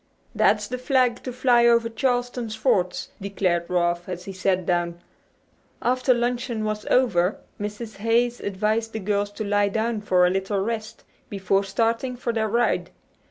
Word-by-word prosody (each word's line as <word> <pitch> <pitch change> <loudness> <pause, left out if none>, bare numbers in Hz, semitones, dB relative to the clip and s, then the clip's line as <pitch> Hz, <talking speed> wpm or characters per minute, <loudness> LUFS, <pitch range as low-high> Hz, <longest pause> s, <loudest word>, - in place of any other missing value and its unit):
"That's 210 -1 +2
the 250 +2 -4
flag 255 -2 +2
to 255 - -3
fly 245 -1 +4
over 235 -1 +4
Charleston's 245 -1 -1
forts!" 215 -6 0
declared 185 -3 -1
Ralph 175 0 0
as 180 -1 -5
he 195 - -6
sat 185 -1 0
down. 175 -1 -1 0.8
After 255 +1 +1
luncheon 240 -1 0
was 215 0 -3
over 200 -7 +2 0.2
Mrs. 210 +2 -6
Hayes 235 +3 +1
advised 215 +3 -1
the 220 - -3
girls 205 0 0
to 215 - -4
lie 205 0 +2
down 220 +1 -1
for 180 -3 +3
a 180 - +3
little 195 +2 -1
rest 215 +1 -4 0.3
before 195 0 +1
starting 230 +5 -1
for 240 -1 -3
their 220 -1 0
ride. 235 +3 +1
215 Hz, 160 wpm, -24 LUFS, 195-235 Hz, 0.8 s, fly